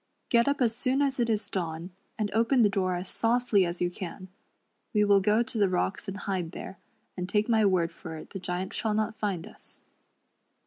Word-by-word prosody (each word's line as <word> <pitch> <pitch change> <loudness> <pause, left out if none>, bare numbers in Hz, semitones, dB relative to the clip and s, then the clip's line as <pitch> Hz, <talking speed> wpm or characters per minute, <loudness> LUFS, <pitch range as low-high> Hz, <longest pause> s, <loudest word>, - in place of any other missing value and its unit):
Get 235 +1 +4
up 280 -1 +1
as 230 -2 +3
soon 255 +2 0
as 270 -2 0
it 235 -1 +2
is 215 -1 0
dawn, 170 -1 -3 0.3
and 210 -2 -1
open 230 +3 +4
the 210 - +5
door 185 -2 0
as 180 +1 -4
softly 230 -5 +2
as 170 +1 -5
you 175 0 +1
can. 185 +1 -7 0.7
We 210 - +5
will 200 -1 +5
go 215 +4 +3
to 230 - -5
•the 200 -2 +3
rocks 185 +2 -1
and 195 +1 -4
hide 185 -4 -3
there, 190 - -8 0.4
and 180 0 -4
take 210 +2 +2
my 220 -3 +4
word 175 -3 +1
for 160 -2 -8
it - - -11
the 195 - -5
Giant 180 +1 -3
shall 215 -2 -1
not 215 0 -1
find 195 -6 -2
us." - - -12
200 Hz, 215 wpm, -28 LUFS, 180-225 Hz, 0.7 s, the